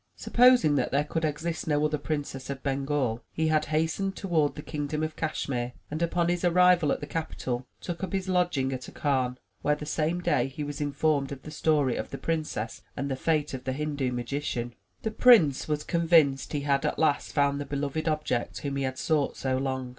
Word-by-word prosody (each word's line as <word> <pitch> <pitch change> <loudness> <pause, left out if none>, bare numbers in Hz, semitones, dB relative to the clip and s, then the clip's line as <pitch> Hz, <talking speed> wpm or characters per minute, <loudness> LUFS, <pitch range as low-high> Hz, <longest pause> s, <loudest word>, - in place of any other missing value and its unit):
Supposing 245 - +5
that - - +1
there 140 +2 +2
could 160 +2 -3
exist 160 +2 -2
no 150 -1 +2
other 150 -1 0
Princess 145 -3 -4
of 135 -1 -5
Bengal, 135 -4 -1
he 160 0 0
had 155 -1 +2
hastened 160 +6 0
toward 160 -6 +1
the 150 - -7
kingdom 150 +1 -3
of 155 0 -3
Cashmere, 125 -6 -2 0.2
and 155 +2 -3
upon 170 0 +1
his 175 0 0
arrival 180 -3 +5
at - - -1
the - - -3
capital, 130 -6 -4
took 175 +1 -5
up 190 - -3
his 190 -1 -2
lodging 175 -8 +1
at 130 -1 -5
a - - -9
khan, 130 -4 0 0.2
where, 150 - +2
the 150 - -7
same 160 +3 0
day, 170 -6 +1
he 135 +3 -6
was 145 +1 -5
informed 145 -1 +1
of 140 -1 -7
the 155 - -8
story 150 -4 +1
of - - -4
the - - -6
princess 155 -9 -3 0.2
and 140 +1 -2
the - - 0
fate 150 +1 0
of 130 -1 -5
the 130 - -2
Hindu 145 -2 -2
magician. 120 -1 -3 0.3
The 220 - -1
prince 215 - +5
was 150 -1 -1
convinced 165 -5 +3
he 145 - 0
had 140 -1 +1
at - - -1
last 150 -3 +1
found 140 -1 +1
the - - -4
beloved 145 +3 -2
object 155 -6 -1
whom 140 -1 -3
he 140 - -1
had 130 0 -3
sought 150 -3 0
so 130 -1 0
long. 130 -1 -2
150 Hz, 210 wpm, -28 LUFS, 135-160 Hz, 0.3 s, Supposing